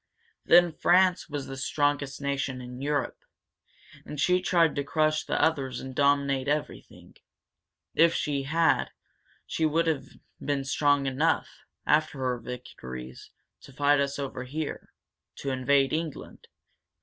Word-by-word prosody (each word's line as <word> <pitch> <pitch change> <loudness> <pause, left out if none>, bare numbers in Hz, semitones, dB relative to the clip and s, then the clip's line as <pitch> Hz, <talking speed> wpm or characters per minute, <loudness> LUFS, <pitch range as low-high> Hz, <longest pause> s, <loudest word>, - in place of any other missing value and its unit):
Then 175 -1 +6
France 180 +2 +3
was 145 -2 -4
the 135 - -7
strongest 145 0 -1
nation 140 -2 -2
in 125 +1 -9
Europe. 145 0 -1 0.8
And 150 - -8
she 180 +4 +3
tried 170 -3 +3
to 140 - -1
crush 155 +1 +1
the - - -2
others 140 -5 0
and 130 0 -7
dominate 140 -1 +2
everything. 150 +1 -4 0.8
If 170 0 +4
she 145 -2 -1
had, 160 +4 +2 0.6
she 160 - -3
would 165 +2 +1
have 160 -4 -1 0.4
been 140 -2 -1
strong 145 0 +2
enough, 135 +5 +1 0.4
after 155 -1 +2
her 125 -2 -1
victories, 65 - -9 0.3
to - - -14
fight 145 +2 +3
us 140 0 -1
over 135 -2 -4
here 150 +4 -5 0.4
to 140 - -4
invade 135 +1 +2
England. 160 -2 -5
145 Hz, 135 wpm, -27 LUFS, 135-155 Hz, 0.8 s, Then